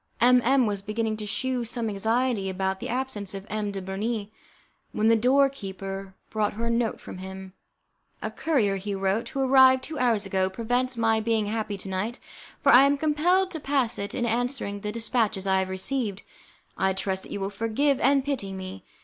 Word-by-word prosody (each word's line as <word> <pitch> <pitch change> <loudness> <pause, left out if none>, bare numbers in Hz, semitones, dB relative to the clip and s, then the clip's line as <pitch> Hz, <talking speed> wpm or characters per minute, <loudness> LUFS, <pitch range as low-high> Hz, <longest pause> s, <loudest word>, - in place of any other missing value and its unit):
M 250 +1 +6
M 260 +1 +4
was 205 -2 -2
beginning 215 +2 -2
to 210 -1 -5
shew 255 +3 -1
some 235 0 -3
anxiety 220 0 0
about 190 0 -2
the - - -5
absence 230 -6 -3
of 195 0 -7
M. 210 -1 -1
de 195 -1 -5
Bernis, 205 +3 -3 0.6
when 215 +1 +2
the 230 - +6
door 260 +5 +4
keeper 195 -5 -7 0.2
brought 215 -1 0
her 230 +3 -3
a - - 0
note 235 -1 0
from - - -9
him. 190 0 -8 0.7
"A - - -4
courier," 225 -12 +1
he 200 +1 -4
wrote, 195 +3 0
"who 275 - -3
arrived 260 0 +6
two 315 -2 -6
hours 230 -5 +2
ago, 190 -1 +1
prevents 245 +5 -1
my 225 -1 +3
being 220 -1 +1
happy 215 -1 -2
to 195 - -9
night, 200 +6 -2 0.5
for 280 - +6
I 255 +3 +8
am 285 +1 +3
compelled 345 +6 +2
to 320 - -4
pass 275 -5 0
it 200 0 -4
in 240 - 0
answering 235 -3 -1
the 210 +1 -4
dispatches 225 -3 0
I 190 -1 +3
have 190 0 -1
received. 200 +1 -2 0.6
I 190 0 +2
trust 190 0 -2
that - - -10
you - - -3
will 195 +1 -3
forgive 230 +7 +1
and 275 +1 +3
pity 240 -9 -2
me. 190 0 -7
220 Hz, 200 wpm, -26 LUFS, 195-255 Hz, 0.7 s, I